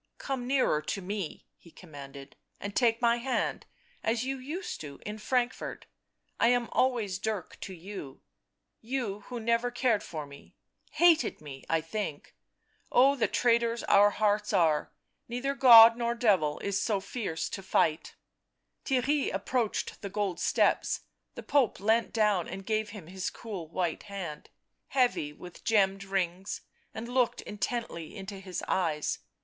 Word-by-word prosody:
" - - -51
Come 260 -3 -2
nearer 255 - +2
to 155 - -3
me," 195 -2 -5
he 170 - -17
commanded, 140 -5 -11
" - - -43
and 200 0 -6
take 230 -1 +2
my 235 0 +4
hand 255 +2 -2 0.2
— - - -33
as 230 +2 0
you 270 0 -3
used 315 +9 -5
to, 140 -2 -9
in 210 +1 -5
Frankfort... 245 +2 -1 0.5
I - - +5
am 245 -1 +2
always 225 -8 +1
Dirk 210 -3 -4
to 190 - -7
you 175 -6 -9 0.3
— - - -54
you 210 -6 -2
who 245 -1 -5
never 230 +2 +1
cared 240 -3 +1
for 155 -6 -6
me, 140 0 -15 0.3
hated 335 -2 +3
me, 140 -3 -10
I 165 -1 +2
think 165 -2 -5 0.3
— - - -39
oh, 270 +3 +5
the 250 - +1
traitors 235 -1 +2
our 205 +1 +6
hearts 210 0 0
are, 155 -3 +2 0.4
neither 250 +4 -2
God 235 -4 +9
nor 235 0 -1
devil 190 -11 +2
is 200 -1 0
so 210 -3 +1
fierce 190 -5 -3
to 195 - -5
fight 160 -4 0 0.3
" - - -51
Theirry 270 +2 +1
approached 240 -4 -2
the 200 - -5
gold 200 -3 -2
steps; - - +2 0.3
the - - -7
Pope 280 -6 +2
leant 220 +3 +2
down 210 -6 +2
and 190 +1 -7
gave 215 -1 0
him 205 -5 -9
bis 185 +2 -4
cool 200 -8 -7
white 170 0 -2
hand, 190 -7 -7 0.4
heavy 245 - +1
with 175 +4 -12
gemmed 195 -3 +2
rings 190 -1 -2 0.3
and 225 +2 -6
looked 245 -1 +1
intently 210 -5 -4
into 195 0 -7
his 185 -2 -5
eyes. 160 -5 0
210 Hz, 160 wpm, -29 LUFS, 180-240 Hz, 0.5 s, God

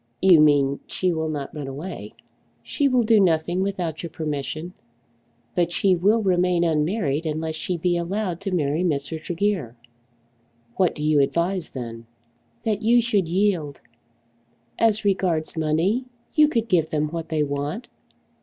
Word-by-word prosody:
"You 185 -4 +6
mean, 140 -2 +4
she 185 -1 0
will 160 -1 -2
not 145 -3 -4
run 145 -3 -6
away." 145 +8 -7 0.5
"She 285 - 0
will 255 -3 +3
do 220 -1 +4
nothing 175 -1 +2
without 180 -5 -2
your 170 - -5
permission. 155 +2 -4 0.8
But 175 -1 +1
she 185 +1 +3
will 210 +6 +2
remain 180 -2 +2
unmarried 160 -1 0
unless 160 +1 -2
she 175 +2 -3
be 175 +1 +1
allowed 180 0 -2
to 195 -1 -3
marry 155 -1 0
Mr. 155 -1 -2
Tregear." 175 - -2 1.0
"What 185 -2 +2
do 150 - -5
you 150 -1 +3
advise 170 +5 0
then?" 115 -3 -7 0.6
"That 215 -2 -1
you 235 +2 +4
should 215 -7 +1
yield. 175 -5 0 1.0
As 220 -2 +2
regards 180 -6 0
money, 165 +10 +1 0.3
you 305 -1 +6
could 230 -6 -1
give 165 -6 +2
them 150 -1 -1
what 165 0 -5
they 155 -2 +1
want. 145 - -3
170 Hz, 150 wpm, -23 LUFS, 150-195 Hz, 1.0 s, You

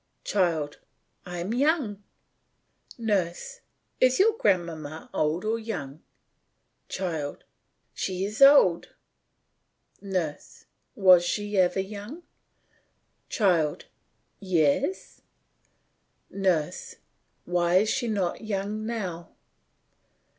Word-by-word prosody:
CHILD: 165 -7 0 0.5
I 175 0 -6
am 180 +6 -3
young. 260 - +1 1.0
NURSE: 200 -7 -2 0.4
Is 255 0 +4
your 435 +3 +4
grandmamma 165 - -1
old 155 +5 0
or 225 +1 0
young? 155 -11 -6 0.9
CHILD: 160 -6 -4 0.5
She 185 0 -2
is 210 +5 -6
old. 275 -12 +6 1.1
NURSE: 185 -7 -4 0.3
Was 185 -5 +6
she 205 +3 -2
ever 185 +1 +3
young? 210 - -8 1.1
CHILD: 170 -8 +1 0.5
Yes. 185 - 0 1.1
NURSE: 180 -6 -1 0.5
Why 175 0 +1
is 210 +3 +4
she 255 -1 -1
not 195 -6 -1
young 215 0 -3
now? 185 -8 -5
190 Hz, 85 wpm, -26 LUFS, 170-215 Hz, 1.1 s, old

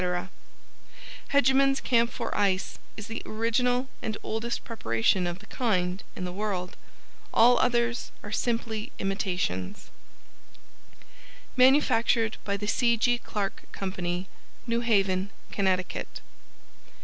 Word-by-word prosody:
Hegeman's 275 0 +4
Camphor 235 -1 +1
Ice 190 -2 0 0.2
is 215 - -6
the 225 +1 -5
original 245 +3 +1
and 215 -1 -3
oldest 225 +2 -3
preparation 180 - +1
of 175 0 -3
the 205 - -15
kind 185 -6 0
in 180 - -4
the 180 - -4
world. 190 -3 -3 0.6
All 240 +2 +6
others 240 -1 +1
are 210 - -7
simply 225 -2 -1
imitations. 180 - -2 1.6
MANUFACTURED 250 -4 +4
BY 200 0 -1
THE 205 +1 -4
C. 235 +2 +3
G. 240 +2 +2
CLARK 200 -4 -4
COMPANY, 185 -1 -3 0.4
New 235 -1 0
Haven, 195 -4 +2 0.2
Connecticut. 185 -2 -1
215 Hz, 105 wpm, -28 LUFS, 190-235 Hz, 1.6 s, All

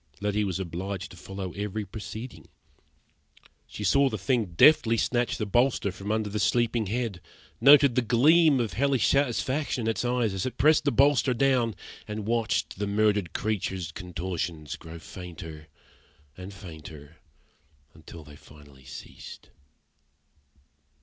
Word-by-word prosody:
Letty 105 +1 0
was 95 -2 -2
obliged 95 +2 -5
to - - -12
follow 95 0 -6
every 105 +1 -4
proceeding. 110 +5 -8 1.2
She 105 - -7
saw 140 +7 +3
the 110 - -4
thing 105 -3 -1
deftly 115 - +5
snatch 120 +1 0
the 110 - -2
bolster 120 -1 +1
from 100 +3 -6
under 110 -1 0
the 105 +1 -3
sleeping 115 0 +1
head; 110 -4 -3 0.4
noted 140 -2 +7
the 125 - +2
gleam 140 +6 +4
of 115 -3 -2
hellish 135 -3 +1
satisfaction 140 0 0
in - - -2
its 110 - -3
eyes 120 -4 0
as 95 +5 -2
it 130 - -7
pressed 150 +3 +4
the 145 - +3
bolster 140 -2 +3
down; 125 -3 +2 0.3
and 105 -1 -5
watched 115 -3 -1
the 105 - -1
murdered 105 -3 +1
creature's 95 -5 -2
contortions 85 -4 -5
grow 80 0 -11
fainter, 80 -2 -10 0.7
and 95 +4 -9
fainter, 80 -5 -11 0.8
until 80 - -12
they 75 0 -14
finally 70 -3 -17
ceased. 70 +2 -11
105 Hz, 140 wpm, -27 LUFS, 90-120 Hz, 1.2 s, noted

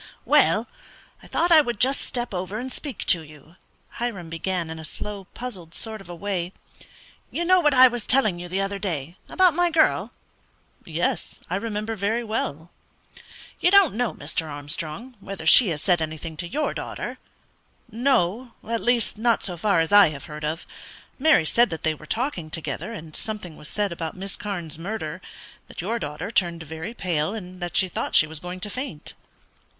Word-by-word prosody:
"Well, - - +4 0.5
I - - -14
thought 345 +1 +1
I 320 -2 +9
would 240 -7 -3
just 265 +2 +3
step 240 -3 -3
over 185 +3 -3
and 255 +3 -4
speak 285 -4 -5
to 175 - +3
you," 155 +1 -15 0.4
Hiram 200 -9 -3
began, 170 0 -2
in 160 - -6
a - - -8
slow, 200 +5 -6
puzzled 185 -10 -6
sort 220 -2 -3
of 195 - -15
a 175 - -6
way. 185 -1 -3 0.8
"You 345 - -2
know 370 +1 +6
what 295 -5 +3
I 255 0 +10
was 240 -3 -3
telling 215 -9 +3
you 175 - -6
the 190 +2 0
other 195 0 -2
day 170 -5 -3
about 370 -3 +5
my 350 +2 +3
girl?" 315 -1 +3 0.7
"Yes; - - -2
I - - +1
remember 225 0 -2
very 220 +4 0
well." 175 -7 -3 0.9
"You - - +4
don't 395 - +7
know, 240 0 0
Mr. 160 +2 -3
Armstrong, 155 - -5
whether 195 -4 -7
she 215 +8 +8
has 155 -2 -3
said 175 -2 +3
anything 160 0 -4
to 175 - -3
your 300 - -1
daughter?" - - -5 0.7
"No; 240 -1 +1
at 230 0 -1
least 240 -3 +2
not 230 0 +2
so 180 - -3
far 175 0 +2
as 165 - -1
I 205 -4 +8
have 145 -2 -8
heard 150 0 -8
of. 155 +3 -2 0.5
Mary 290 - +5
said 235 +9 +4
that 160 - -6
they 160 - +2
were 155 0 -13
talking 220 - -2
together, 165 +7 -4
and 160 -8 -8
something 210 -7 -5
was 150 - -10
said 205 -2 -1
about 165 -1 -5
Miss 195 +1 -4
Carne's 175 -7 -5
murder; 185 -2 -4 0.5
that - - -11
your 225 +6 -1
daughter 150 +5 -4
turned 170 -6 +1
very 160 +8 -6
pale, 175 -1 0
and 185 -3 -8
that 175 -1 -1
she 190 - +4
thought 180 - -3
she - - +7
was 155 0 -6
going 180 +2 -6
to 210 - -3
faint." 250 - -6
190 Hz, 190 wpm, -25 LUFS, 165-235 Hz, 0.9 s, I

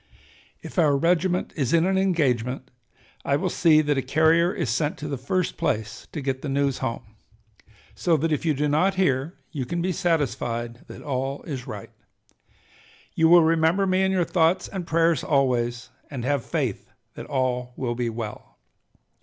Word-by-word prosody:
If - - -4
our 145 -4 +4
regiment 180 +3 +1
is 135 -4 -1
in 165 +1 +3
an 190 +1 +1
engagement, 135 -10 0 0.5
I 140 - +1
will 180 +4 -1
see 155 -3 +4
that 145 -2 +1
a - - 0
carrier 160 +5 +3
is 165 - -2
sent 145 +5 -1
to 150 - -6
the 145 - -2
first 165 +8 -2
place 110 -1 -2
to 150 - -5
get 135 -1 -2
the 145 - -4
news 140 -1 0
home. 115 - -3 0.9
So 170 -3 +1
that 160 +2 -1
if 150 - 0
you 155 -3 +1
do 150 +2 0
not 180 +7 +2
hear 155 -3 0
you 140 -4 -3
can 170 +8 -3
be 180 +2 0
satisfied 120 -9 -2
that - - -10
all 135 0 -3
is 130 -6 -6
right. 105 -2 -8 1.2
You 160 0 +3
will 175 -1 +8
remember 165 +4 +3
me 185 0 +2
in 190 0 +2
your 185 -2 +1
thoughts 170 +2 +2
and 185 -3 -6
prayers 165 -3 +2
always, 120 -4 0 0.2
and 130 -4 -5
have 140 -2 0
faith - - -3 0.2
that - - -9
all 125 -2 -1
will 120 -3 -2
be 120 0 -2
well." 115 -2 -7
150 Hz, 180 wpm, -24 LUFS, 130-170 Hz, 1.2 s, will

